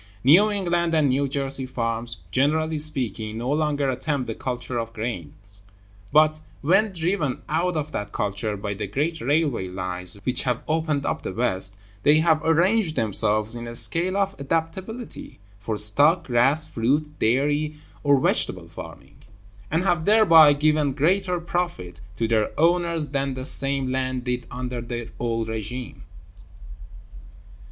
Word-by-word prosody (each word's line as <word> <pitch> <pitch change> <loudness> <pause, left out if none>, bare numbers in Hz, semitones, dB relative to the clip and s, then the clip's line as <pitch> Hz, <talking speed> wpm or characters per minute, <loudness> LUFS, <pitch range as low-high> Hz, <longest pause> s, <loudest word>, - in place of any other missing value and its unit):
New 175 - +6
England 175 -4 0
and 150 -3 +3
New 140 +2 +1
Jersey 135 -1 -1
farms, 115 -1 -3
generally 155 +3 +1
speaking, 115 -7 -2
no 120 +4 -3
longer 150 -2 0
attempt 135 +1 -2
the 115 - -4
culture 125 0 -4
of 115 0 -5
grains, 100 -3 -7 0.5
but 155 +1 +4 0.2
(when 195 +8 +2
driven 165 -5 -2
out 165 +3 -1
of 150 0 -3
that 105 0 -5
culture 105 +1 -2
by 100 +1 -4
the 105 +1 -5
great 150 - -2
railway 140 - 0
lines 90 0 -3
which 125 +3 +2
have 125 -2 -2
opened 155 -3 -1
up - - -2
the - - -5
West) 100 -4 +2 0.2
they 145 +7 +4
have 160 -1 +2
arranged 170 +2 +2
themselves 110 +1 +2
in 120 0 -6
a 115 - -6
scale 165 - +3
of 195 -1 0
adaptability 175 - -4 0.2
for 105 +1 -4
stock, 145 - +4
grass, 135 +5 +3
fruit, 150 +4 -1
dairy, 145 +6 +1 0.3
or 140 -2 +3
vegetable - - 0
farming; - - -12 0.5
and 165 +3 0
have 170 -4 0
thereby 165 -8 +7
given 150 -1 +1
greater 180 +5 +1
profits 175 - -4
to 115 +3 -1
their 110 -1 +1
owners 170 -2 +1
than 135 -1 -2
the 130 0 -5
same 135 -1 +2
land 130 -1 -2
did 125 0 -3
under 125 -1 -5
the 120 -1 -6
old 115 -2 -2
régime. 110 +3 -6
140 Hz, 145 wpm, -23 LUFS, 115-160 Hz, 0.5 s, thereby